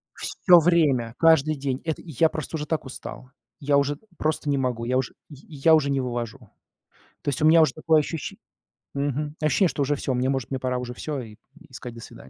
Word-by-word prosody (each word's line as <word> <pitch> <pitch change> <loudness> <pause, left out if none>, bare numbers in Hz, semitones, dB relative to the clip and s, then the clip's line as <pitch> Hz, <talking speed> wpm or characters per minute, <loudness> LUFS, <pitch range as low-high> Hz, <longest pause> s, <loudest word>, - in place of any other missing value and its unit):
Всё 180 -3 +4
время, 145 -9 +2
каждый 155 -2 +4
день, 135 -1 -3
это 160 -2 -3
и 160 - -10
я 160 +5 +3
просто 155 +1 -5
уже 150 0 -4
так 160 -3 -2
устал, 130 0 -9 0.3
я 145 0 +2
уже 140 +1 +1 0.2
просто 155 -1 -1
не 140 -1 +1
могу, 125 -3 -1
я 130 +2 0
уж 130 -2 0 0.2
й 150 - -11 0.2
я 160 +4 +5
уже 140 -3 +3
не 135 -1 +1
вывожу. 120 -1 -4 0.8
То - - -6
есть 140 - -1
у - - +5
меня 165 +1 +7
уже 130 - +3
такое 155 0 +3
ощущен 165 +6 -5 0.6
мгм, 145 +2 -2
ощущение, 165 +4 +3
что 145 - -3
уже 145 +2 0
всё, 135 -1 -2
может, 130 0 -1
мне 130 - -2
пора 125 -1 -1
уже 125 0 -5
всё, 145 +2 -4
и 110 -2 -11 0.3
и - - -23
сказать: 120 +1 -8
"До 115 - -10
свидания". 65 - -12
140 Hz, 220 wpm, -25 LUFS, 130-155 Hz, 0.8 s, меня